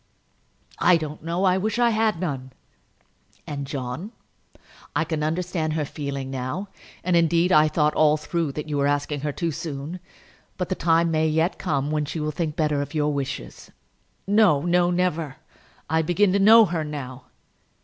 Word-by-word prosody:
"I 180 Hz, -1 st, +5 dB
don't 155 Hz, -1 st, -6 dB
know. 170 Hz, +3 st, -1 dB
I 185 Hz, 0 st, +3 dB
wish 215 Hz, +2 st, -1 dB
that 240 Hz, -, +2 dB
I -, -, +4 dB
had 215 Hz, -5 st, +1 dB
none." 135 Hz, -7 st, -4 dB, 0.9 s
"And, 140 Hz, -2 st, -5 dB
John; 140 Hz, -, -5 dB, 0.8 s
I -, -, +2 dB
can 160 Hz, -1 st, -3 dB
understand 160 Hz, 0 st, -1 dB
her 155 Hz, -2 st, -1 dB
feeling 140 Hz, -2 st, -5 dB
now; 135 Hz, +10 st, -4 dB, 0.3 s
and 180 Hz, -1 st, +1 dB
indeed, 170 Hz, +2 st, +3 dB
I 155 Hz, -2 st, +6 dB
thought 150 Hz, -1 st, +1 dB
all 155 Hz, 0 st, +4 dB
through 160 Hz, -1 st, -2 dB
that 150 Hz, +1 st, -5 dB
you 150 Hz, -1 st, -2 dB
were 140 Hz, 0 st, +2 dB
asking 145 Hz, 0 st, -1 dB
her 145 Hz, +1 st, -2 dB
too 170 Hz, +3 st, -2 dB
soon; 155 Hz, +2 st, -6 dB, 0.6 s
but 180 Hz, -, -3 dB
the -, -, +1 dB
time 165 Hz, -1 st, +2 dB
may 160 Hz, 0 st, +2 dB
yet 160 Hz, +3 st, 0 dB
come 145 Hz, -5 st, -1 dB
when 150 Hz, -1 st, 0 dB
she 155 Hz, +3 st, -5 dB
will 155 Hz, 0 st, -1 dB
think 155 Hz, -1 st, -3 dB
better 150 Hz, -2 st, +1 dB
of 145 Hz, -, -6 dB
your 150 Hz, -1 st, +1 dB
wishes." 140 Hz, -1 st, -5 dB, 0.6 s
"No, 200 Hz, -8 st, +4 dB
no; 175 Hz, 0 st, +3 dB
never. 170 Hz, -5 st, -1 dB, 0.5 s
I 160 Hz, 0 st, +2 dB
begin 185 Hz, +4 st, +2 dB
to 200 Hz, -, +2 dB
know 220 Hz, +3 st, +8 dB
her 170 Hz, -4 st, -2 dB
now." 135 Hz, -4 st, -7 dB
155 Hz, 180 wpm, -24 LUFS, 145-175 Hz, 0.9 s, know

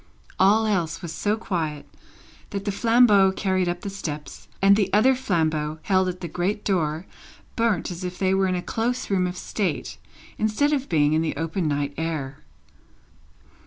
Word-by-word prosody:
All 210 Hz, +4 st, +5 dB
else 175 Hz, -5 st, -1 dB
was 170 Hz, -, -5 dB
so 210 Hz, +1 st, 0 dB
quiet, 160 Hz, -9 st, -3 dB, 0.6 s
that 200 Hz, 0 st, -5 dB
the 205 Hz, -, 0 dB
flambeau 215 Hz, -3 st, +5 dB
carried 185 Hz, -2 st, 0 dB
up 175 Hz, 0 st, -3 dB
the 200 Hz, -, -4 dB
steps, 150 Hz, -6 st, -7 dB
and 195 Hz, +1 st, +6 dB
the 200 Hz, -2 st, 0 dB
other 220 Hz, +6 st, +5 dB
flambeau 160 Hz, -10 st, -1 dB
held 190 Hz, 0 st, +2 dB
at 180 Hz, 0 st, -6 dB
the 175 Hz, -, -4 dB
great 185 Hz, +6 st, -2 dB
door, 165 Hz, -3 st, 0 dB, 0.5 s
burnt 225 Hz, -7 st, 0 dB
as 175 Hz, +1 st, -7 dB
if 180 Hz, 0 st, -5 dB
they 190 Hz, -1 st, +1 dB
were 190 Hz, 0 st, +2 dB
in 185 Hz, -, 0 dB
a 175 Hz, -, -3 dB
close 245 Hz, +1 st, -2 dB
room 185 Hz, -2 st, +2 dB
of 180 Hz, 0 st, -5 dB
state, 180 Hz, -9 st, -3 dB, 0.4 s
instead 220 Hz, +8 st, +1 dB
of 275 Hz, -2 st, -1 dB
being 150 Hz, -2 st, +3 dB
in 160 Hz, -, +2 dB
the 165 Hz, -, -2 dB
open 165 Hz, +3 st, -2 dB
night 145 Hz, -1 st, -1 dB
air. 150 Hz, -4 st, -3 dB
185 Hz, 175 wpm, -24 LUFS, 160-205 Hz, 0.6 s, and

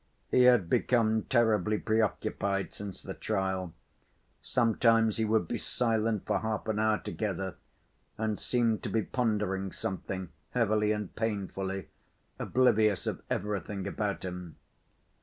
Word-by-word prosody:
He 125 Hz, -, +6 dB
had 120 Hz, -8 st, +6 dB
become 110 Hz, +2 st, +2 dB
terribly 110 Hz, -4 st, +3 dB
preoccupied 100 Hz, -3 st, 0 dB
since 100 Hz, -2 st, -7 dB
the -, -, -5 dB
trial; 95 Hz, -4 st, -2 dB, 0.7 s
sometimes 115 Hz, -1 st, +3 dB
he 110 Hz, -, +1 dB
would 110 Hz, -5 st, +2 dB
be -, -, -2 dB
silent 110 Hz, -3 st, 0 dB
for -, -, +1 dB
half 110 Hz, 0 st, -3 dB
an 110 Hz, -1 st, 0 dB
hour 110 Hz, 0 st, +3 dB
together, 95 Hz, -4 st, -3 dB, 0.6 s
and 110 Hz, -1 st, -1 dB
seemed 115 Hz, -3 st, +1 dB
to -, -, -3 dB
be 110 Hz, -1 st, +1 dB
pondering 105 Hz, -6 st, -1 dB
something 95 Hz, -1 st, -4 dB, 0.3 s
heavily 105 Hz, -3 st, +2 dB
and 105 Hz, -3 st, -3 dB
painfully, 95 Hz, -3 st, -3 dB, 0.5 s
oblivious 110 Hz, -6 st, +3 dB
of -, -, -3 dB
everything 100 Hz, -1 st, -2 dB
about 105 Hz, -2 st, -2 dB
him. 90 Hz, -2 st, -6 dB
105 Hz, 125 wpm, -30 LUFS, 95-110 Hz, 0.7 s, He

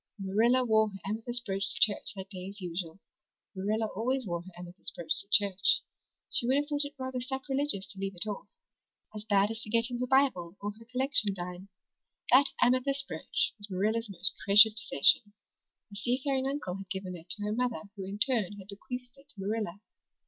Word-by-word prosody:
Marilla 225 Hz, +6 st, +2 dB
wore 220 Hz, -2 st, +3 dB
her 195 Hz, -, -9 dB
amethyst 230 Hz, +4 st, -3 dB
brooch 195 Hz, -1 st, -1 dB
to -, -, 0 dB
church 205 Hz, -1 st, +3 dB
that 190 Hz, +1 st, -8 dB
day 185 Hz, -1 st, -6 dB
as 200 Hz, +2 st, -9 dB
usual. 175 Hz, -1 st, -5 dB, 0.6 s
Marilla 210 Hz, +4 st, 0 dB
always 245 Hz, +5 st, -2 dB
wore 175 Hz, -3 st, -3 dB
her 185 Hz, +2 st, -12 dB
amethyst 175 Hz, +1 st, -6 dB
brooch 170 Hz, -, -1 dB
to -, -, -13 dB
church. 200 Hz, -2 st, +4 dB, 0.5 s
She 240 Hz, -, +2 dB
would 260 Hz, -, +3 dB
have 290 Hz, +1 st, +2 dB
thought 290 Hz, -1 st, 0 dB
it 285 Hz, 0 st, -8 dB
rather 260 Hz, -1 st, -4 dB
sacrilegious 265 Hz, -4 st, -1 dB
to 195 Hz, -, -11 dB
leave 195 Hz, -1 st, -3 dB
it 175 Hz, -, +5 dB
off 205 Hz, -1 st, -5 dB, 0.7 s
as 210 Hz, 0 st, -6 dB
bad 205 Hz, 0 st, +3 dB
as 225 Hz, 0 st, -5 dB
forgetting 230 Hz, +3 st, 0 dB
her 250 Hz, -, -1 dB
Bible 240 Hz, -10 st, +2 dB
or 205 Hz, +1 st, -3 dB
her 225 Hz, +2 st, -16 dB
collection 255 Hz, -6 st, +3 dB
dime. 180 Hz, +1 st, -7 dB, 0.6 s
That 275 Hz, +3 st, +7 dB
amethyst 270 Hz, +3 st, +2 dB
brooch -, -, -1 dB
was 205 Hz, 0 st, -9 dB
Marilla's 215 Hz, +4 st, 0 dB
most 195 Hz, 0 st, +3 dB
treasured 210 Hz, +2 st, +8 dB
possession. 205 Hz, -, +3 dB, 0.6 s
A -, -, -10 dB
seafaring 260 Hz, +5 st, 0 dB
uncle 270 Hz, -10 st, -3 dB
had 195 Hz, -1 st, -10 dB
given 190 Hz, -2 st, -5 dB
it 170 Hz, +1 st, -13 dB
to 205 Hz, -, -6 dB
her 210 Hz, 0 st, -1 dB
mother 245 Hz, -1 st, -1 dB
who 195 Hz, -, -6 dB
in 195 Hz, +2 st, -6 dB
turn 210 Hz, -4 st, +1 dB
had 195 Hz, 0 st, -12 dB
bequeathed 250 Hz, +5 st, -8 dB
it 280 Hz, +1 st, -21 dB
to 220 Hz, -, -17 dB
Marilla. 205 Hz, -1 st, -3 dB
210 Hz, 190 wpm, -30 LUFS, 195-250 Hz, 0.7 s, treasured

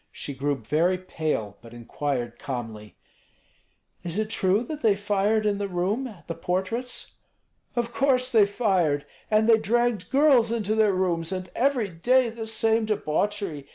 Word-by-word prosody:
She 140 Hz, -, -6 dB
grew 140 Hz, +2 st, -1 dB
very 155 Hz, +10 st, +1 dB
pale, 155 Hz, -, -3 dB
but 115 Hz, 0 st, -13 dB
inquired 120 Hz, 0 st, -4 dB
calmly, 110 Hz, -5 st, -6 dB, 1.1 s
"Is 175 Hz, +1 st, -3 dB
it 215 Hz, 0 st, -1 dB
true 195 Hz, +3 st, +2 dB
that 300 Hz, +4 st, -6 dB
they 215 Hz, -3 st, +4 dB
fired 205 Hz, +2 st, +1 dB
in 205 Hz, -1 st, +1 dB
the 200 Hz, -, -2 dB
room, 195 Hz, +8 st, -1 dB
at 185 Hz, -10 st, -14 dB
the 165 Hz, -, -3 dB
portraits?" 190 Hz, +9 st, -3 dB, 0.6 s
"Of 235 Hz, -1 st, -2 dB
course 255 Hz, +1 st, +2 dB
they 215 Hz, -4 st, +5 dB
fired! 185 Hz, -10 st, +1 dB, 0.2 s
And 215 Hz, +1 st, +3 dB
they 225 Hz, -1 st, +6 dB
dragged 235 Hz, -2 st, 0 dB
girls 270 Hz, -5 st, +4 dB
into 215 Hz, -3 st, 0 dB
their 220 Hz, -2 st, +3 dB
rooms, 175 Hz, -2 st, 0 dB
and 185 Hz, -1 st, -5 dB
every 250 Hz, -5 st, +1 dB
day 240 Hz, +8 st, +2 dB
the 225 Hz, -1 st, -7 dB
same 225 Hz, 0 st, +1 dB
debauchery. 200 Hz, -5 st, -2 dB
200 Hz, 155 wpm, -25 LUFS, 165-225 Hz, 1.1 s, they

